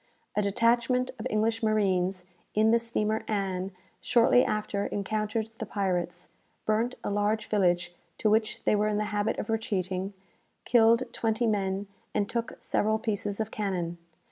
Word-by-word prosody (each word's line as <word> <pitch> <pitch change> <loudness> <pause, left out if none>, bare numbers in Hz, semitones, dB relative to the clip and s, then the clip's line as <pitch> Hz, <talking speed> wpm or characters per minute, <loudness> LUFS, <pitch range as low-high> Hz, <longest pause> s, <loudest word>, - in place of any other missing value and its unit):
"A 210 - +3
detachment 235 +5 +2
of 225 - -2
English 225 +2 +1
marines, 190 -4 +1 0.3
in 220 +1 +4
the 235 - +5
steamer 220 -2 -1
'Ann,' 190 -3 -1 0.3
shortly 245 +1 +4
after 210 -1 -1
encountered 215 +2 -2
the 220 - -3
pirates, 180 -4 -2 0.4
burnt 225 +4 +1
a - - -2
large 205 +2 +1
village 175 -4 +1 0.2
to - - +1
which 215 +1 +1
they - - +3
were 210 +1 +2
in 210 -1 0
the 210 - 0
habit 205 +2 0
of - - -3
retreating, 195 -4 -1 0.5
killed 230 0 +5
twenty 225 +1 0
men, 200 -2 0 0.3
and 205 -1 +1
took 235 +1 -2
several 215 +1 +1
pieces 205 -2 -2
of 220 0 -2
cannon. 180 -5 -2
215 Hz, 150 wpm, -28 LUFS, 195-225 Hz, 0.5 s, the